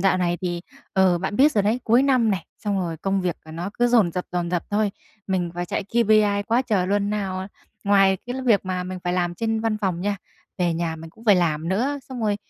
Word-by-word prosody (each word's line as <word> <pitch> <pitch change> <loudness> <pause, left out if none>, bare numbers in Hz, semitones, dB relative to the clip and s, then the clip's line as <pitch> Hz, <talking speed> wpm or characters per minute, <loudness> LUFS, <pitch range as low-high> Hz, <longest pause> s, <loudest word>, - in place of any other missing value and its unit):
dạo 190 0 +3
này 175 -1 0
thì, 175 -1 -2 0.3
ờ, 185 -2 +3
bạn 190 +3 -3
biết 290 +3 +5
rồi 205 - +2
đấy, 225 +5 +1
cuối 235 +3 +4
năm 255 -5 +3
này, 190 - -2
xong 205 -2 -1
rồi 170 -3 -2
công 195 +4 -1
việc, 180 -3 -1
à, 160 - -11
nó 175 +5 -4
cứ 240 - +4
dồn 225 -9 +3
dập, 180 - -3
dồn 175 -1 -1
dập 175 -1 0
thôi. 210 0 +1 0.4
Mình 185 -3 -1
phải 175 0 -3
chạy 195 - -2
KPI 215 -3 +3
quá 235 +5 +1
trời 200 -7 0
luôn, 205 +1 +1
nào, 195 -3 -2
à 190 - -5 0.4
ngoài 195 -1 +4
cái 245 - -4
l 265 - -4
việc 215 -5 +4
mà 185 -1 -2
mình 185 0 -5
phải 175 - 0
làm 175 -1 0
trên 225 +2 -1
văn 225 -1 0
phòng 185 -4 -1
nha, 200 +2 -1 0.4
về 175 -2 +1
nhà 165 -1 -2
mình 160 0 -10
cũng 225 - -18
phải 205 -3 +6
làm 165 -2 0
nữa. 255 +10 0
Xong 255 -2 -6
rồi 210 -2 +1
195 Hz, 255 wpm, -23 LUFS, 175-215 Hz, 0.4 s, phải